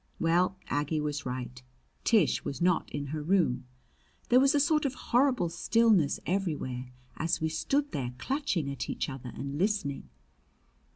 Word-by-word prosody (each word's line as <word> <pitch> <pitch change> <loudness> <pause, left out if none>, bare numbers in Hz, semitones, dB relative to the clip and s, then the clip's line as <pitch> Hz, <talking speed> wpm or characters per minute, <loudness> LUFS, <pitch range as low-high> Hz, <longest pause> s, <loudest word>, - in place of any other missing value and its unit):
Well, 175 +3 +2
Aggie 150 +2 0
was 145 -2 -3
right. 125 0 -5 0.4
Tish 215 -10 +3
was 140 - -4
not 175 -1 +2
in 145 0 -4
her 155 - -2
room. 150 -7 +1 0.6
There 245 - +6
was 275 +2 +4
a - - +4
sort 305 +1 +3
of 275 -2 -1
horrible 250 -8 +2
stillness 185 -1 +3
everywhere 150 -9 -2 0.3
as 165 +1 0
we 160 - 0
stood 280 - 0
there 125 -3 -3
clutching 200 - -1
at 135 -3 -5
each - - -2
other 130 -3 -7
and 140 +1 -5
listening. 190 - -1
165 Hz, 155 wpm, -29 LUFS, 140-220 Hz, 0.6 s, There